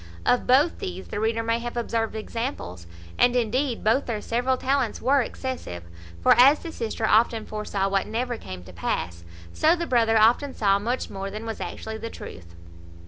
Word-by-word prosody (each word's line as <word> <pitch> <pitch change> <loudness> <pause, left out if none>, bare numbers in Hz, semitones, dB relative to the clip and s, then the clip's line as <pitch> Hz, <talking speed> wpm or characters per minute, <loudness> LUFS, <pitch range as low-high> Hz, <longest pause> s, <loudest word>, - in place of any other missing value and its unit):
Of 245 - +2
both 280 +7 +4
these 185 +1 -6
the - - -3
reader 225 +1 0
may 230 +1 0
have 240 0 -5
observed 225 -1 -1
examples: 215 - -5 0.3
and, 245 0 +4
indeed, 245 +2 0
both 230 +6 +2
their 225 -3 -2
several 245 +4 0
talents 260 -3 0
were 275 +1 +3
excessive; 240 - -5 0.4
for, - - +5
as 275 +4 +8
the 335 - -8
sister 225 -4 -3
often 220 0 +3
foresaw 210 -2 -2
what 195 0 0
never 240 +3 -2
came 95 -1 -8
to 90 0 -13
pass, 85 0 -3 0.3
so 320 +3 +4
the 340 -1 -3
brother 230 -5 +3
often 240 +6 +3
saw 200 -2 +3
much 240 +5 -2
more 195 0 -5
than 215 +3 -7
was 225 -1 -5
actually 220 0 -6
the 230 - -5
truth. 85 - -11
225 Hz, 185 wpm, -25 LUFS, 205-250 Hz, 0.4 s, as